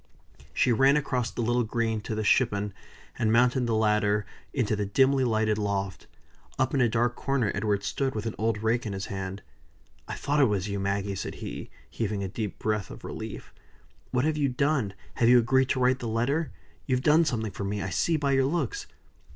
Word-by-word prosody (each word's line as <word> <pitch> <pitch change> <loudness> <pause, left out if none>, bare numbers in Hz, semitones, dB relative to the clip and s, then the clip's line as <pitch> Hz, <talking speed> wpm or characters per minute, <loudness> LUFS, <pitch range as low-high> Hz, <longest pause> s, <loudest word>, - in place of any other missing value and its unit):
She 125 - +2
ran 135 +5 +5
across 130 -4 -1
the 120 - -3
little 120 +2 +2
green 110 -1 -1
to 110 - -4
the 110 - -1
shippon, 105 -2 +2 0.5
and 110 - +2
mounted 125 +2 +3
the 115 - +1
ladder 105 -1 +2 0.3
into 115 -5 0
the 105 - -1
dimly 135 +5 +3
lighted 110 -3 +1
loft. 100 -2 -2 0.5
Up 130 -1 +1
in 135 - +2
a 120 - +4
dark 120 +2 +1
corner 135 -6 0
Edward 100 -1 0
stood, 135 +4 -1
with 110 - -3
an 115 - -2
old 110 -1 0
rake 115 +1 +1
in 100 - -3
his 95 0 -4
hand. 95 0 -5 0.6
"I - - -4
thought 145 +1 0
it 140 - +6
was 105 -4 0
you, 100 -1 -3
Maggie!" 100 0 -1
said 95 - -5
he, - - -7 0.2
heaving 105 -3 -3
a - - -2
deep 105 +1 -4
breath 105 -2 -1
of - - -10
relief. - - -7 0.6
"What 125 +2 +1
have 155 -1 +1
you 145 -2 +2
done? 130 -6 0 0.2
Have 115 - +4
you 125 - +8
agreed 130 +3 +3
to 130 - +1
write 130 +1 +3
the 120 - -4
letter? 130 +8 0 0.4
You've 130 -1 +1
done 155 +3 +5
something 115 -8 -1
for 100 - -6
me, 100 +1 -2
I 95 - -4
see 165 - +1
by 140 -2 0
your 135 -1 +3
looks." 410 - -2
115 Hz, 210 wpm, -27 LUFS, 105-130 Hz, 0.6 s, you